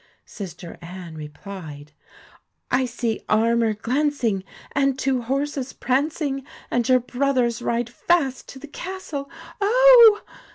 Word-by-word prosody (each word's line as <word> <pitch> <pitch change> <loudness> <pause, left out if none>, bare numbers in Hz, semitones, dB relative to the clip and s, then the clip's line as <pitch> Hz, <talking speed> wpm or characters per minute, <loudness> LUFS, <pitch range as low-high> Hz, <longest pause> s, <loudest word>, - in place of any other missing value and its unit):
Sister 175 -3 -9
Anne 175 -1 -9
replied: 150 -1 -9 0.4
' - - -27 0.3
I 255 +1 +3
see 235 -2 -3
armour 225 0 +2
glancing, 245 -3 0 0.3
and 275 -1 +1
two 265 -2 0
horses 270 +2 -2
prancing, 275 +1 -1 0.3
and 245 0 0
your 255 0 +6
brothers 250 -2 0
ride 235 0 -1
fast 275 -1 0
to - - -10
the 285 +3 -10
castle, 300 -4 -6 0.3
oh 470 0 +7
255 Hz, 120 wpm, -23 LUFS, 220-285 Hz, 0.4 s, oh